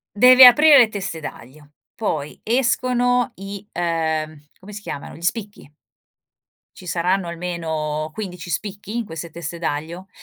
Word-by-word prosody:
devi 255 +4 +8
aprire 290 +4 +8
le 240 -3 +6
teste 200 -5 -5
d'aglio. 145 +1 -11 0.3
Poi 155 -10 -4
escono 245 +1 +1
i 195 +1 -8
ehm, 160 -3 -2
come 205 +3 -13
si 210 - -7
chiamano, 140 - -7
gli - - -13
spicchi. 205 -2 -4 1.1
Ci 185 - -13
saranno 180 +2 0
almeno 160 -3 -4
15 180 -4 -7
spicchi 205 +3 -5
in 235 - -2
queste 165 -3 -8
teste 170 +1 -7
d'aglio. 165 +4 -4
180 Hz, 135 wpm, -21 LUFS, 160-215 Hz, 1.1 s, devi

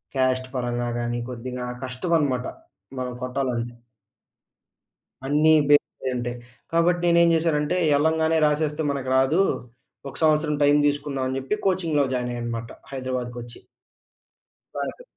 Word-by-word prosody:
Cost 130 -1 +1
పరంగా 120 -1 -1
గాని, 120 0 -2
కొద్దిగా 125 +1 -5 0.2
కష్టమన్మాట 130 -1 0 0.5
మనం 125 -1 -3
కొట్టాలంటే... 125 -2 -2 1.5
అన్నీ 150 +3 +4 0.2
బేస్ 145 - +5 0.2
అయి 130 - 0
ఉంటాయి. 120 0 -3 0.4
కాబట్టి 170 +1 +3
నేనేం 170 0 +5
చేశానంటే 160 -1 +1 0.2
ఎళ్ళంగానే 160 +1 +2
రాసేస్తే 150 +1 0
మనకు 135 -2 -3
రాదు. 135 +7 +3 0.7
ఒక - - -12
సంవత్సరం 155 -1 +3
టైమ్ 145 +1 +5
తీసుకుందాం 145 -2 -1
అని 130 - -2
చెప్పి 135 +11 -2
కోచింగ్‌‌లో 165 -7 +1
జాయిన్ 125 -1 -1
అయ్యానన్మాట 115 -1 -4 0.2
హైదరాబాద్‌కొచ్చి. 125 -2 -5 1.1
క్లాసు. - - -4
135 Hz, 115 wpm, -24 LUFS, 125-155 Hz, 1.5 s, బేస్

